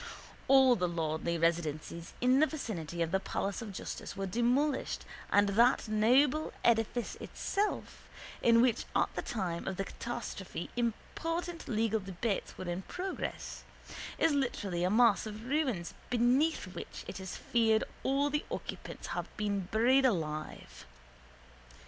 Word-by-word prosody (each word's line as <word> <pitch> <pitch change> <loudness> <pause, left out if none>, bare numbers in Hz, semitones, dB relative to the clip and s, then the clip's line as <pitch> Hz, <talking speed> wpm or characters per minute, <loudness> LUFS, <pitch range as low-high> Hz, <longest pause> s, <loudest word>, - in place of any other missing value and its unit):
All 265 -2 +7
the 180 -4 0
lordly 165 0 -1
residences 165 0 -1
in 255 +2 +5
the 310 - +5
vicinity 175 - -3
of 165 - -3
the 190 - +2
palace 195 +1 -2
of 220 -3 -6
justice 195 - -6
were 195 - -1
demolished 245 +8 +1 0.3
and 205 0 +5
that 235 +4 +4
noble 255 +8 +3
edifice 235 0 +2
itself, 410 +1 -3 0.3
in 230 0 +6
which 250 -3 +2
at - - +2
the - - -1
time 180 -7 -3
of 190 - -2
the 195 - 0
catastrophe 225 -7 -5
important 330 +9 -3
legal 220 -1 +1
debates 195 +2 -3
were 185 - -6
in 175 +1 -2
progress, 370 - -5 0.5
is 325 - +3
literally 205 -11 -1
a 180 - +3
mass 225 0 +4
of 215 +2 -7
ruins 255 - 0 0.2
beneath 250 +6 +3
which - - -7
it - - -6
is 190 -1 -6
to - - -5
be - - -15
feared 225 -2 +4 0.2
all 280 +2 +1
the 295 +2 0
occupants - - -6
have - - -3
been 200 -3 -1
buried 250 +5 +4
alive. 155 - -4
225 Hz, 145 wpm, -32 LUFS, 185-255 Hz, 0.5 s, All